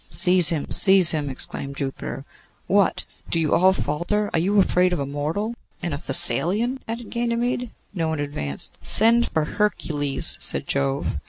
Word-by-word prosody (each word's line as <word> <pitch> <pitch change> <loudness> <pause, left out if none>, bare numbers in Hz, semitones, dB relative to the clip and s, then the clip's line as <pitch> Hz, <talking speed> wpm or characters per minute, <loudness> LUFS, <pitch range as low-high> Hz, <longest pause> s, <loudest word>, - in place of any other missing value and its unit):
'Seize 180 -2 +4
him, 160 -4 -2
seize 190 -3 +6
him!' 150 -3 -3
exclaimed 140 +1 -3
Jupiter. 135 -1 -6 0.4
'What! 200 0 0 0.3
do 165 - -1
you 155 -2 -1
all 185 +1 +3
falter? 190 +5 -3
Are 165 - 0
you 195 +5 -1
afraid 180 -2 +1
of 175 - -3
a 140 - -3
mortal?' 155 +11 -4 0.3
'And 170 - -4
a - - -4
Thessalian?' 180 - +2
added 230 0 -8
Ganymede. 240 +1 -3 0.2
No 165 -4 -3
one 160 -1 -4
advanced. 105 - -6
'Send 230 +2 +3
for 160 -1 -2
Hercules,' 150 -8 +3
said - - +2
Jove. 70 0 -3
175 Hz, 160 wpm, -21 LUFS, 145-210 Hz, 0.4 s, seize